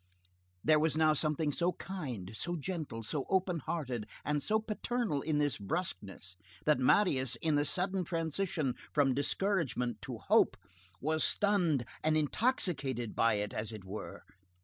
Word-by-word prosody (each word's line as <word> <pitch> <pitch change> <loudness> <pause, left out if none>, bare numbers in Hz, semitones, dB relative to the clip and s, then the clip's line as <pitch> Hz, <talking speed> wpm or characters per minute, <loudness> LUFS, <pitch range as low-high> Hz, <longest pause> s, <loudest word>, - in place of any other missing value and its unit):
There 155 0 +5
was 155 0 +2
now 155 -1 +5
something 150 0 +1
so 175 +5 +1
kind, 130 - -6
so 175 +10 -1
gentle, 155 -8 -4
so 135 +5 -1
openhearted, 165 - -1 0.2
and 150 0 0
so 215 +9 +2
paternal 220 - -2
in 155 0 0
this 145 -4 +1
brusqueness, 95 - -4 0.3
that 150 -3 +4
Marius, 130 - +3
in 155 +6 0
the 145 0 +2
sudden 185 +3 0
transition 165 -4 -1 0.2
from 140 -3 +4
discouragement 140 - 0
to - - -5
hope, - - +3 0.4
was 155 +2 0
stunned 175 - +2 0.2
and 155 0 +3
intoxicated 150 - 0
by 115 -1 +3
it, 105 0 -2
as 110 +1 -3
it 105 -4 -9
were. 100 +3 -7
150 Hz, 145 wpm, -33 LUFS, 125-175 Hz, 0.4 s, There